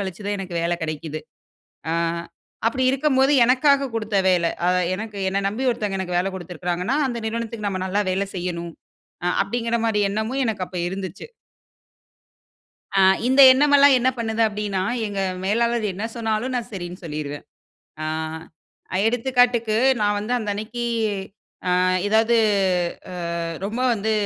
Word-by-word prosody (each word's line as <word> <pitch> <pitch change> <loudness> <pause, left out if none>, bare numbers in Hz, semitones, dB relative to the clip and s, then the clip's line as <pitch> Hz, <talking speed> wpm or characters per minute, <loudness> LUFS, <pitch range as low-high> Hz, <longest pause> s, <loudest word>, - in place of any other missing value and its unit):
கழிச்சு 195 +1 -5
தான் 205 - -1
எனக்கு 185 -3 -5
வேல 170 +1 +1
கிடைக்குது. 155 0 -4 0.7
ஆ - - 0 0.7
அப்படி 255 +3 0
இருக்கும்போது, 270 0 +2
"எனக்காக 275 +2 +3
குடுத்த 215 -2 -2
வேல. 175 -2 +3 0.2
அ - - +4 0.3
எனக்கு 210 +1 -6
என்ன 195 - 0
நம்பி 235 +6 -3
ஒருத்தங்க 210 -4 -2
எனக்கு 180 -2 -2
வேல 190 +2 0
குடுத்துருக்கிறாங்கன்னா, 180 - -3
அந்த 240 -2 -3
நிறுவனத்துக்கு 225 -2 -3
நம்ம 185 -1 -3
நல்லா 200 +2 0
வேலை 195 +2 0
செய்யணும்." 170 -1 -4 0.5
அ - - 0 0.2
அப்படீங்கிற 235 +3 -1
மாரி 215 -2 +1
எண்ணமும் 220 +6 -1
எனக்கு 210 -5 -1
அப்ப 180 - -9
இருந்துச்சு. 190 - -6 1.7
அ, - - +6 0.3
இந்த 265 +2 +5
எண்ணமெல்லாம் 285 0 +5
என்ன 250 - +2
பண்ணுது 225 0 0
அப்டின்னா? 205 -2 -2 0.2
எங்க 200 -1 -3 0.2
மேலாளர் 235 +3 +1
என்ன 205 +4 -4
சொன்னாலும் 230 +2 -1
நான் 240 0 -4
சரின்னு 180 -1 -7
சொல்லிருவேன். 150 -2 -5 0.6
அ - - -2 1.0
எடுத்துக்காட்டுக்கு 245 -2 +2 0.3
நான் 205 0 +2
வந்து 215 +4 -3
அந்த 215 -3 -3
அன்னைக்கு, 225 +3 -5 0.9
அ - - +2 0.4
எதாவது 225 +2 +3 0.8
அ - - -6 0.5
ரொம்ப 220 +5 -3
வந்து 220 0 -1
215 Hz, 140 wpm, -22 LUFS, 185-235 Hz, 1.7 s, அ